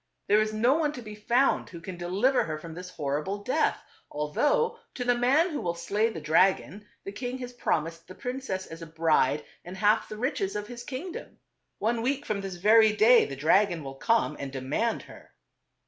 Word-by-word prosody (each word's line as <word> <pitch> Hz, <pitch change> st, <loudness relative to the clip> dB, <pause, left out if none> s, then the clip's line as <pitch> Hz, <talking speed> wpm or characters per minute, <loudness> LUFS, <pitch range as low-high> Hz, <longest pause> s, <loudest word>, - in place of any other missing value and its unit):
There 210 Hz, +1 st, +5 dB
is 215 Hz, 0 st, 0 dB
no 230 Hz, +5 st, +3 dB
one 300 Hz, -1 st, 0 dB
to 250 Hz, -, -7 dB
be 215 Hz, -1 st, -8 dB
found 235 Hz, +6 st, +1 dB
who 170 Hz, -, -9 dB
can 180 Hz, +2 st, -7 dB
deliver 190 Hz, +10 st, +1 dB
her 155 Hz, -1 st, -4 dB
from 160 Hz, +1 st, -9 dB
this 180 Hz, +2 st, -8 dB
horrible 160 Hz, +5 st, -3 dB
death, 300 Hz, +8 st, 0 dB, 0.3 s
although 375 Hz, -, 0 dB, 0.2 s
to 250 Hz, -, -3 dB
the 245 Hz, 0 st, +3 dB
man 270 Hz, +9 st, +3 dB
who 295 Hz, -, -3 dB
will 170 Hz, -1 st, -2 dB
slay 205 Hz, +6 st, 0 dB
the 215 Hz, -, -6 dB
dragon, 190 Hz, +6 st, +1 dB, 0.2 s
the 195 Hz, -, -6 dB
king 245 Hz, +4 st, -5 dB
has 250 Hz, -1 st, -7 dB
promised 165 Hz, -7 st, -2 dB
the 185 Hz, -, -11 dB
prin 250 Hz, +2 st, -5 dB
cess 190 Hz, -7 st, -4 dB
as 165 Hz, +1 st, -10 dB
a 165 Hz, -, -7 dB
bride 155 Hz, -3 st, +1 dB, 0.2 s
and 180 Hz, +2 st, -9 dB
half 210 Hz, +2 st, +2 dB
the 215 Hz, -, -7 dB
riches 220 Hz, -5 st, -2 dB
of 210 Hz, 0 st, -3 dB
his 240 Hz, +1 st, -9 dB
king 285 Hz, +9 st, -6 dB
dom. -, -, -9 dB, 0.4 s
One 230 Hz, +2 st, 0 dB
week 275 Hz, +4 st, -1 dB
from 205 Hz, -2 st, -2 dB
this 195 Hz, -2 st, -5 dB
very 215 Hz, +4 st, +5 dB
day 225 Hz, +3 st, +6 dB
the 140 Hz, -, -6 dB
dragon 170 Hz, +4 st, +2 dB
will 135 Hz, -1 st, -6 dB
come 225 Hz, -, +1 dB
and 140 Hz, -1 st, -5 dB
demand 140 Hz, -, -1 dB
her." -, -, -15 dB
210 Hz, 210 wpm, -27 LUFS, 165-245 Hz, 0.4 s, day